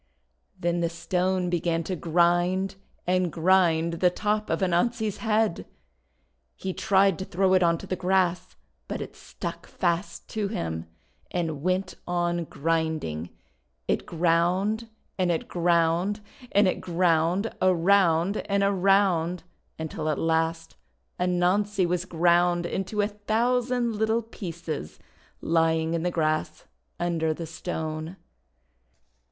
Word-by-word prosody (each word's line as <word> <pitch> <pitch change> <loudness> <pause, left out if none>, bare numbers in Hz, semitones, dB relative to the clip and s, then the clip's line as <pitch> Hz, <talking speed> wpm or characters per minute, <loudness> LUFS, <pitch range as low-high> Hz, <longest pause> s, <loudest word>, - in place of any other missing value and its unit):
Then 175 0 0
the 170 -1 +1
Stone 180 +2 -1
began 165 -1 0
to 185 +3 -3
grind 175 +3 +2 0.3
and 180 -1 +1
grind 170 -1 +3
the 180 - +5
top 210 +3 -1
of - - 0
Anansi's 215 +4 +1
head. 220 -4 0 0.9
He 190 -1 -4
tried 195 -2 +3
to 190 - -4
throw 190 +1 +1
it 185 - +5
onto 170 -1 +2
the 185 - -2
grass, 180 - 0 0.3
but - - -4
it - - -7
stuck - - -7
fast 175 +3 -2
to 215 -2 -2
him, 80 - -4 0.4
and 160 -5 -2
went 185 +2 0
on 175 -1 0
grinding. 155 - -2 0.6
It - - -1
ground, 180 +7 +1 0.3
and 180 -1 +2
it 165 - -2
ground, 175 +4 +1 0.3
and 200 0 +4
it 185 - -1
ground, 175 +3 +1
around 185 0 +3
and 200 0 +2
around, 190 -3 +2 0.3
until 160 -1 -3
at 150 - 0
last 165 0 -1 0.4
Anansi 180 +2 +2
was 175 +1 -1
ground 175 0 +2
into 195 +4 -2
a 205 - +2
thousand 235 +2 0
little 220 +2 +1
pieces 170 - -6 0.4
lying 160 0 +2
in 165 - 0
the 180 - 0
grass 155 -2 -1 0.3
under 165 -2 0
the 165 - -5
Stone. 160 0 -5
175 Hz, 125 wpm, -26 LUFS, 165-195 Hz, 0.9 s, the